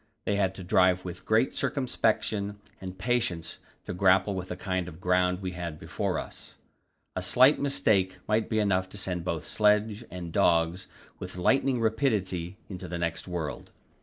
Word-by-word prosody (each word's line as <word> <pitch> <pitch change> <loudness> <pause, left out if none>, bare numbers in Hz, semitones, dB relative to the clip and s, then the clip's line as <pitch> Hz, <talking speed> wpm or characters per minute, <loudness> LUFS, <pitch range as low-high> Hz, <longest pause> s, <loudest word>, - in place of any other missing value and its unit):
They 100 - +1
had 95 -2 +1
to 95 - -8
drive 90 0 +3
with 90 0 -8
great 110 +4 +3
circumspection 110 -6 0 0.2
and 95 0 -7
patience 110 -6 -1 0.3
to - - -4
grapple 95 +2 +3
with 90 -1 -4
the 90 - -4
kind 95 -1 -2
of 80 -1 -10
ground 90 +1 +1
we 90 - -2
had 85 -3 -5
before - - -2
us; - - -8 0.6
a - - -1
slight 130 +4 +5
mistake 100 -9 +1
might 110 +1 +1
be 110 - 0
enough 95 -3 +1
to 105 - -10
send 90 -3 -2
both 85 -3 -3
sledge 105 +1 +2
and 85 -2 -7
dogs 85 +2 +2 0.3
with - - -7
lightning 130 +6 +2
rapidity 105 -7 0
into 90 -2 -7
the 85 +1 -4
next 85 +1 -3
world. 80 -6 -4
95 Hz, 165 wpm, -28 LUFS, 90-105 Hz, 0.6 s, slight